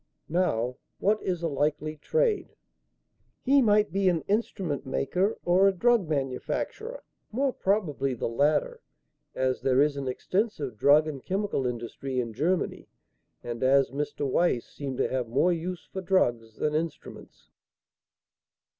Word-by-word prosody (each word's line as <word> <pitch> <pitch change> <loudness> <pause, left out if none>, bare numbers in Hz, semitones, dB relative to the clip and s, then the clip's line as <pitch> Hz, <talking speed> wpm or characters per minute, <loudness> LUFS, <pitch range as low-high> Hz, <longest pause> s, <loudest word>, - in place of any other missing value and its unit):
Now, 125 -8 0 0.2
what 210 +2 +1
is 180 -2 -2
a - - +2
likely 150 +1 -1
trade?" 465 - 0 0.9
"He 275 +1 +5
might 210 -4 +3
be 195 +1 +2
an 170 -3 +1
instrument 195 -8 -1
maker 180 +10 0
or 185 +3 +5
a - - +5
drug 220 -2 +2
manufacturer; 150 - -3 0.3
more 265 +3 0
probably 150 -10 0
the - - -2
latter, 155 - +1 0.5
as 130 0 0
there 130 -1 +2
is 145 0 +3
an 135 -1 -3
extensive 155 - -2
drug 145 +7 +5
and 140 -4 -6
chemical 190 -9 -1
industry 125 +2 -4
in 115 -2 -3
Germany, 165 +10 -1 0.6
and 120 -1 -5
as 135 +1 +4
Mr. 145 +1 -3
Weiss 135 -3 +1
seemed 135 -3 -6
to - - +1
have 130 -2 -2
more 140 +10 +2
use 170 +1 -5
for 190 - -3
drugs 120 - +1
than 150 - -1
instruments." 160 +1 -5
155 Hz, 140 wpm, -27 LUFS, 130-195 Hz, 0.9 s, He